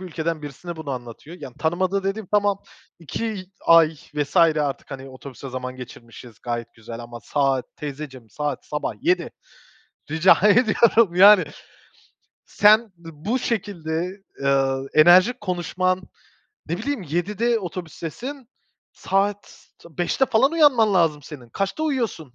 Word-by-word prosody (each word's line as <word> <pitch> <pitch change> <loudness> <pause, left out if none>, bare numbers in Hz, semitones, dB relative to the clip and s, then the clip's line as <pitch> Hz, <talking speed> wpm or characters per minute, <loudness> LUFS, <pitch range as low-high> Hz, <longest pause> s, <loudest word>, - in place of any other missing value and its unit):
bir - - -8
ülkeden 165 -2 -3
birisine 150 +4 -8
bunu 160 -3 -6
anlatıyor. 125 +6 -8
Yani 125 - -9
tanımadığı 185 +4 0
dediğim, 195 +1 -3
tamam, 205 -1 +2 0.4
2 195 +4 -5 0.2
ay 165 -1 +6 0.2
vs. 145 +3 -3
artık, 155 -6 +2
hani, 135 -1 -8
otobüste 130 0 -10
zaman 130 0 -6
geçirmişiz 120 -2 -12
gayet 120 -1 -5
güzel 115 +1 -9
ama 120 0 -9
saat 135 +3 0
teyzeciğim 135 -5 -8
saat 145 +3 -4
sabah 150 - -3
07.00 355 +4 +1 0.8
Rica 160 +4 +5
ediyorum, 225 -2 +4
yani. 195 0 +8 1.0
Sen 215 +2 +5 0.2
dı - - -7
bu 205 - -2
şekilde, 185 -5 -3 0.2
eee, 135 -1 +2 0.2
enerjik 180 +9 +6
konuşman 185 0 -1 0.7
ne 170 +2 -3
bileyim, 280 +1 -3
07.00'de 205 +9 -1
otobüstesin, 190 - -7 0.4
saat 200 +1 -2
ta 165 -4 -18
05.00'te 180 +9 +1
falan 265 +6 +3
uyanman 260 -10 +4
lazım 160 -5 +2
senin. 130 -5 -11
Kaçta 195 - -3
uyuyorsun? 230 - -3
170 Hz, 130 wpm, -22 LUFS, 140-205 Hz, 1.0 s, yani